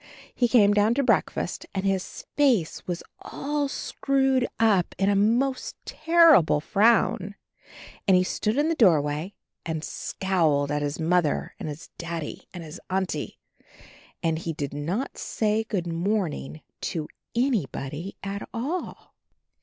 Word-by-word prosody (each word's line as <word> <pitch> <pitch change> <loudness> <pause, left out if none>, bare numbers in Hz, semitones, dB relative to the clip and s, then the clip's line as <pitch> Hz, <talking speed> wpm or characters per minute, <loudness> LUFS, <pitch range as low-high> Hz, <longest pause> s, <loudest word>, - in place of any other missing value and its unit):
He 245 - +2
came 210 -4 +5
down 210 +3 +3
to 280 - +2
breakfast - - 0
and 190 0 -1
his 195 -1 -2
face 250 - +2
was 175 -2 -3 0.2
all 290 0 -2
screwed 270 -2 0
up 210 -6 +3
in 195 +1 +2
a - - +2
most 240 +6 +1
terrible 325 - +5
frown, 205 +2 +2 0.7
and 190 -2 +6
he 180 - +3
stood 215 +5 -1
in 295 +2 +3
the 330 - +2
doorway 160 - +2 0.3
and 160 -1 -3
scowled 160 -4 0
at 150 0 0
his 145 +2 -2
Mother 165 -1 +1
and - - -4
his 150 +2 -9
Daddy 170 -2 -5
and 175 -2 -8
his 160 +2 -9
Auntie. 185 -5 -2 0.9
And 160 -1 +1
he 165 0 -3
did 145 -2 -4
not 175 - -3
say, 220 0 0
"Good 195 -6 -2
morning" 165 - -2 0.3
to 155 -2 -2 0.3
any 235 - +2
body 150 +8 -6
at 200 +1 -5
all. 295 +10 -4
190 Hz, 140 wpm, -26 LUFS, 160-235 Hz, 0.9 s, and